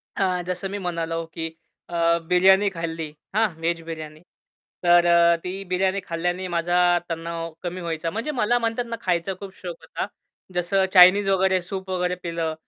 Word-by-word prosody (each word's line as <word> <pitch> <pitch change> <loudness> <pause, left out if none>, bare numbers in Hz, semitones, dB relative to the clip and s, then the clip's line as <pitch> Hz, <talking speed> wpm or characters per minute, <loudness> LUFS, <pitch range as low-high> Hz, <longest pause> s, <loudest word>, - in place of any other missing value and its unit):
हां, 185 -2 0
जसं 180 +2 -3
मी 200 - -4
म्हणालो, 165 -2 -3
की 165 -1 -3 0.4
अ, 170 0 +2
बिर्यानी 190 +3 +5
खाल्ली, 165 -3 -4 0.3
हां, 225 0 +4
व्हेज 165 0 -1
बिर्याणी. 155 -1 -7 0.6
तर 175 0 +6
अ, 170 0 +5
ती 190 +2 -5
बिर्याणी 190 +2 0
खाल्ल्याने 175 +2 -2
माझा 175 0 0 0.3
तणाव 165 0 -4
कमी 180 +1 -4
व्हायचा. 165 -1 -3
म्हणजे 225 - -3
मला 240 -2 +2
म्हणतात 230 +1 -1
ना, 230 0 -4
खायचा 180 +1 0
खूप 195 -1 -8
शौक 175 -2 -7
होता. - - -5 0.5
जसं 190 +2 +1
चायनीज 190 +2 +7
वगैरे, 190 -1 +3
सूप 190 +1 -6
वगैरे 180 -1 0
पिलं, 165 -2 -2
180 Hz, 160 wpm, -24 LUFS, 170-190 Hz, 0.6 s, चायनीज